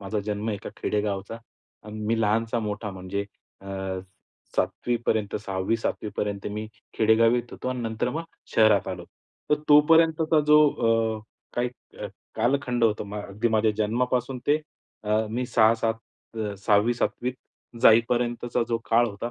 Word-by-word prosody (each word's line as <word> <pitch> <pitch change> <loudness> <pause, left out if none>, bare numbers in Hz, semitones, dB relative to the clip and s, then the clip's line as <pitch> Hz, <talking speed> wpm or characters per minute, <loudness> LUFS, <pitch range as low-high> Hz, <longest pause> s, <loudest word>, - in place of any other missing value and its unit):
माझा 100 +1 -3
जन्म 105 +1 -2
एका 100 -2 -5
खेडेगावचा 105 0 -2 0.5
आणि 105 0 -7
मी 115 0 +1
लहानचा 115 +2 +1
मोठा 105 -1 -3
म्हणजे 95 +2 -4 0.4
अ, - - -9 0.9
7वी 120 -1 0
पर्यंत, 105 -2 0
6वी-7वी 105 +2 -2
पर्यंत 100 -1 -2
मी 105 +1 -4 0.3
खेडेगावीत 115 +2 +3
होतो - - -5
आणि 130 -1 -3
नंतर 115 +1 -2
मग 160 +4 -3 0.3
शहरात 110 -3 +4
आलो. 90 -2 -5 0.5
तर - - +6
तोपर्यंतचा 160 +1 +5
जो 150 0 +7 0.6
अ, - - -12 0.3
काही 120 +1 0 0.3
अ, - - -2 0.3
कालखंड 125 -2 +1
होता 110 -2 +1
म 100 0 -9
अगदी 105 +3 -2
माझ्या 110 -1 +3
जन्मापासून 125 +4 0
ते 145 - +4 0.5
अ, 110 +1 +1
मी 125 +3 -2
6-7 115 0 +3 0.4
अ, 105 -2 -3
6वी-7वी 110 +5 +1
त 125 -1 -18
जाईपर्यंतचा 120 +1 +3
जो 115 -1 0
काळ 120 +1 +5
होता 110 +3 -5
115 Hz, 140 wpm, -25 LUFS, 105-120 Hz, 0.9 s, जो